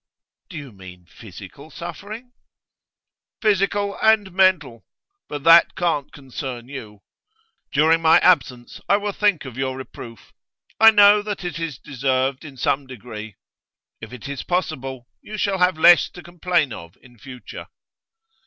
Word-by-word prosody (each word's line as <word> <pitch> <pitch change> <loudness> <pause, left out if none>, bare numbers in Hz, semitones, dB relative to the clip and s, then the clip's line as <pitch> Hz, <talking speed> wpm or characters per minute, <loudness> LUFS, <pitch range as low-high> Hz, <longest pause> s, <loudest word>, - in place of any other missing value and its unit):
'Do 180 - -9
you 140 -4 -9
mean 90 -3 -14
physical 100 - -13
suffering?' 210 +9 -9 1.1
'Physical 200 -1 0
and 220 -3 +3
mental. 175 - +1 0.5
But 145 -2 -6
that 165 +1 +6
can't 165 -6 -1
concern 130 -3 -8
you. 110 -7 -10 0.7
During 160 +3 +3
my 160 0 +6
absence 130 -8 +1
I 200 - +5
will 205 0 -3
think 200 -7 0
of 130 -2 -9
your 130 -1 -2
reproof. 115 -4 -11 0.5
I 225 - +9
know 205 -1 +6
that 205 -2 -6
it 175 -1 -5
is 165 -6 -5
deserved, 130 0 -2
in 140 -4 -12
some 135 +3 -1
degree. 110 -4 -10 0.7
If 115 0 -9
it 125 -1 -9
is 140 -1 -5
possible, 135 -8 -3 0.2
you 215 - -8
shall 200 -2 -1
have 180 -2 +2
less 175 +2 +6
to 175 - -11
complain 175 -6 -1
of 85 0 -11
in 120 -2 -19
future. 125 0 -11
150 Hz, 145 wpm, -21 LUFS, 125-185 Hz, 1.1 s, I